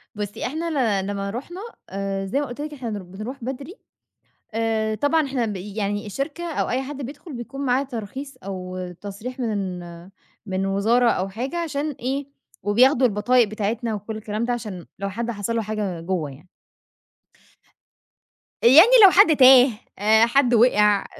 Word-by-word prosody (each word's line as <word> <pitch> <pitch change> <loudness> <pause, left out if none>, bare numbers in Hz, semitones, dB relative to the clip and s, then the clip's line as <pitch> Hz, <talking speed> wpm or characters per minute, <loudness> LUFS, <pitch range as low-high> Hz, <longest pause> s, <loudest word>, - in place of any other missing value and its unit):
بُصّي، 205 -1 -5
إحنا 320 +5 -3 0.3
ل - - -5
لمّا 200 -1 -3
رُحنا، 315 - -7 0.3
آآ 195 0 -3
زي 265 +9 -1
ما 290 - -1
قُلت 245 +3 -7
لِك 300 0 -5
إحنا 250 -5 -6
ن 210 -1 -4
بنروح 215 +8 -8
بدري 275 - -6 0.8
آآ، 220 -1 0
طبعًا 290 +6 +1
إحنا 255 -3 -1
بي 205 -1 -6
يعني 205 0 -2
الشركة 280 - -4
أو - - -1
أي 255 +2 0
حد 280 +1 -7
بيدخل، 285 +4 -8
بيكون 260 +3 -7
معاه 255 +2 +2
ترخيص 260 +2 -7
أو 185 -1 -6
تصريح 210 +6 -7
من 200 -6 -2 0.7
من 190 0 -2
وزارة 225 +5 +2
أو 190 -2 -1
حاجة 255 - -4
عشان 305 -3 -2
إيه، 270 +2 -4 0.4
وبياخدوا 250 +5 +4
البطايق 230 +3 +2
بتاعتنا 215 +2 -2
وكلّ 215 +2 -5
الكلام 215 +1 -4
ده، 245 - 0
عشان 210 -7 -6
لو 200 0 -2
حد 235 +4 -3
حصل 210 +2 -3
له 225 - +1
حاجة 205 -5 -3
جُوّه 165 -5 -2
يعني. 145 +7 -15 2.1
يعني 310 - +8
لو 390 - +11
حد 360 -6 +6
تاه 255 -1 +8 0.3
آآ، 220 +2 +5
حد 245 +1 +2
وقع 210 -3 +4
230 Hz, 160 wpm, -23 LUFS, 205-265 Hz, 2.1 s, لو